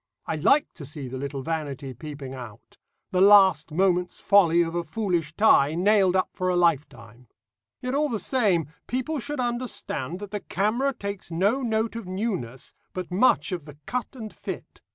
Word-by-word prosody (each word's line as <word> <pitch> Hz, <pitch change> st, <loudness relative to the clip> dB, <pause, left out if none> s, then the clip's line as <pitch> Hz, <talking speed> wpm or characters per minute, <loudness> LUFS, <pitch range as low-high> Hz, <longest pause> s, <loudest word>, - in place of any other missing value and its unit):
I -, -, -2 dB
like 275 Hz, -, +4 dB
to 155 Hz, -, -10 dB
see 140 Hz, -1 st, -7 dB
the 130 Hz, +1 st, -6 dB
little 140 Hz, 0 st, -4 dB
vanity 145 Hz, -4 st, -4 dB
peeping 145 Hz, -2 st, -8 dB
out 120 Hz, -4 st, -11 dB, 0.3 s
the 185 Hz, -, +2 dB
last 195 Hz, -6 st, +6 dB
moment's 180 Hz, +1 st, +1 dB
folly 175 Hz, -4 st, +5 dB
of 165 Hz, 0 st, -4 dB
a 175 Hz, 0 st, -1 dB
foolish 175 Hz, -7 st, -2 dB
tie, 160 Hz, -8 st, +5 dB
nailed 190 Hz, 0 st, +3 dB
up 185 Hz, -, +2 dB
for 185 Hz, -1 st, -1 dB
a 180 Hz, -, +1 dB
lifetime. 130 Hz, -9 st, -1 dB, 0.5 s
Yet 250 Hz, +1 st, -3 dB
all 295 Hz, +1 st, +1 dB
the 225 Hz, -4 st, -2 dB
same, 200 Hz, -, +1 dB, 0.2 s
people 260 Hz, +5 st, -2 dB
should 290 Hz, +4 st, -4 dB
understand 240 Hz, -, -3 dB
that 200 Hz, 0 st, -8 dB
the 205 Hz, -, -2 dB
camera 215 Hz, +10 st, 0 dB
takes 200 Hz, -7 st, -6 dB
no 200 Hz, +10 st, +1 dB
note 225 Hz, -2 st, -1 dB
of 230 Hz, -5 st, -6 dB
newness, 185 Hz, -, -4 dB, 0.2 s
but 180 Hz, -1 st, -5 dB
much 205 Hz, +3 st, +3 dB
of 175 Hz, -5 st, -4 dB
the 150 Hz, -1 st, -12 dB
cut 250 Hz, +1 st, -4 dB
and 220 Hz, -4 st, -8 dB
fit. -, -, -8 dB
185 Hz, 175 wpm, -25 LUFS, 150-220 Hz, 0.5 s, last